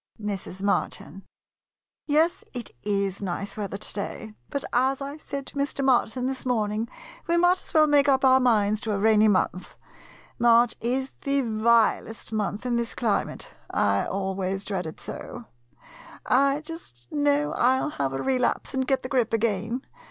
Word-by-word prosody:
Mrs. 195 -2 -5
Martin 200 - -2 0.8
Yes, 315 +3 +2
it 240 -2 -5
is 200 0 -1
nice 200 +1 -4
weather 200 -2 -4
to - - -3
day; 210 +2 -5 0.2
but, 280 -2 -3
as 260 +2 +2
I 280 +2 -6
said 280 -3 -6
to - - -12
Mr. 280 -1 -1
Martin 250 -1 +2
this 265 0 -3
morning, 220 -2 -1 0.4
we 340 0 +2
might 355 +1 +5
just - - -10
as - - -9
well 310 -1 +7
make 290 -1 +4
up 270 0 +3
our 260 0 +6
minds 215 -4 +2
to 220 - -2
a - - 0
rainy 215 +1 +4
month. 185 -2 0 0.6
March 235 0 +5
is 260 +3 -1
the 280 0 +1
vilest 225 -1 +1
month 210 +1 -2
in 240 -1 +1
this 235 -1 -3
climate 225 -4 -1
— - - -33
I 100 -1 +2
always 195 0 -2
dread 190 -5 -3
it 160 - -9
so. 240 -1 -7 0.8
I 275 +3 +3
just 305 - -9
know 290 0 +2
I 255 +2 +3
'11 300 - -2
have 135 -1 0
a 135 - -3
relapse 255 -2 0
and 260 -1 -1
get 270 - +1
the 255 - -5
grip 250 -5 +1
again. 225 +3 -1
235 Hz, 175 wpm, -26 LUFS, 205-270 Hz, 0.8 s, well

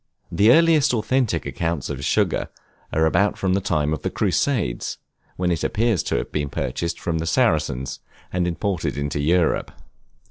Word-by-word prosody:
The 105 +3 +5
earliest 155 -3 +5
authentic 120 +2 0
accounts 80 -5 -2
of 70 -2 -5
sugar, - - +1 0.4
are 80 +1 +2
about 100 +6 +2
the 95 0 +1
time 75 -5 0
of 75 - -4
the - - -1
Crusades, 105 - -1 0.4
when 90 -1 0
it 80 -3 -1
appears 110 -5 +1
to - - -2
have - - -2
been 75 -2 -2
purchased 85 +4 -3
from 80 -1 -2
the 80 - -3
Saracens, 75 - +1 0.3
and 90 -1 +1
imported 90 -2 -2
into 70 0 -2
Europe. 85 +3 +1
85 Hz, 155 wpm, -22 LUFS, 75-105 Hz, 0.4 s, The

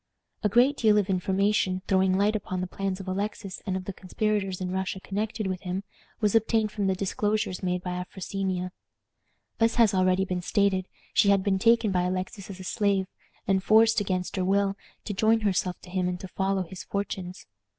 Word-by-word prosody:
A 210 - +2
great 250 +7 +4
deal 215 -2 +4
of 200 -1 +1
information, 190 0 +1
throwing 190 -1 +3
light 205 +2 +2
upon 185 -3 -3
the 185 - -1
plans 195 +1 -3
of 195 - -8
Alexis 200 +1 -4
and 190 -1 0
of 185 - -7
the 195 - -4
conspirators 195 0 -1
in 180 -1 -3
Russia 190 0 -2
connected 210 +2 -3
with 185 -1 -2
him, 185 +1 -3 0.4
was 210 -2 +2
obtained 220 -1 +2
from 205 -2 -1
the 190 - +2
disclosures 205 0 -1
made 180 -1 -1
by 180 - -3
Afrosinia. 185 0 -3 0.9
As 225 0 +3
has 230 -4 +5
already 185 0 +3
been 180 -1 -2
stated, 195 -1 +1 0.3
she 200 - +4
had 200 -1 +4
been 190 -1 +1
taken 230 0 +4
by 180 -1 +2
Alexis 185 +2 -3
as 190 -1 -8
a - - -7
slave, 200 0 +1 0.4
and 190 -1 +2
forced, 220 +1 +5
against 185 -1 -2
her 185 - +1
will, 195 +1 +2 0.3
to 210 - -3
join 220 +3 +3
herself 185 -3 0
to 180 - -13
him 185 -1 0
and 180 0 -2
to 190 - -6
follow 190 0 0
his 180 +1 -9
fortunes. 190 -2 -4
195 Hz, 195 wpm, -27 LUFS, 185-210 Hz, 0.9 s, has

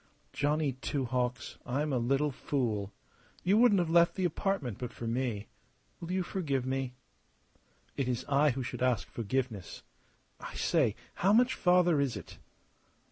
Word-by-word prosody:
Johnny 150 0 +1
Two 130 +1 -2
Hawks, 125 0 -2
I'm 145 +4 -1
a 125 - +2
little 135 +5 +1
fool! 110 -7 -2 0.5
You 195 +4 +4
wouldn't 235 -4 +6
have 175 -3 +1
left 170 0 +5
the 190 -2 0
apartment 170 - -1
but 125 0 -4
for 120 - -8
me. 115 -3 -1 0.5
Will 170 - -6
you 185 0 +1
forgive 140 -9 -2
me?" 130 -1 -2 1.0
"It 135 - -1
is 125 -2 -2
I 145 +2 +4
who 130 0 -2
should 125 - -6
ask 125 -4 +1
forgiveness. 115 -4 -3 0.6
I - - -8
say, 135 - +2 0.2
how 195 +3 +2
much 245 +3 +5
farther 180 -4 +4
is 130 -6 -1
it?" - - -11
135 Hz, 155 wpm, -31 LUFS, 125-170 Hz, 1.0 s, wouldn't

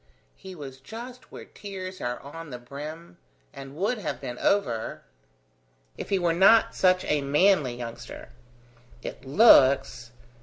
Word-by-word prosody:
"He 190 -1 -11
was 135 -4 -9
just 240 - -10
where - - -10
tears 185 -2 -8
are 120 0 -3
on 165 +3 -10
the 125 - -7
brim, 145 - -9 0.3
and 135 0 -10
would 205 +8 -1
have 195 - -4
been 125 -3 -7
over, 120 - -1 0.9
if - - -7
he 195 - +2
were 175 -2 +1
not 200 +6 +5
such 185 0 +2
a 150 -1 +1
manly 145 -2 +2
youngster." 120 0 -9 0.7
"It 130 - -8
looks. 135 - +5
150 Hz, 140 wpm, -26 LUFS, 130-190 Hz, 0.9 s, not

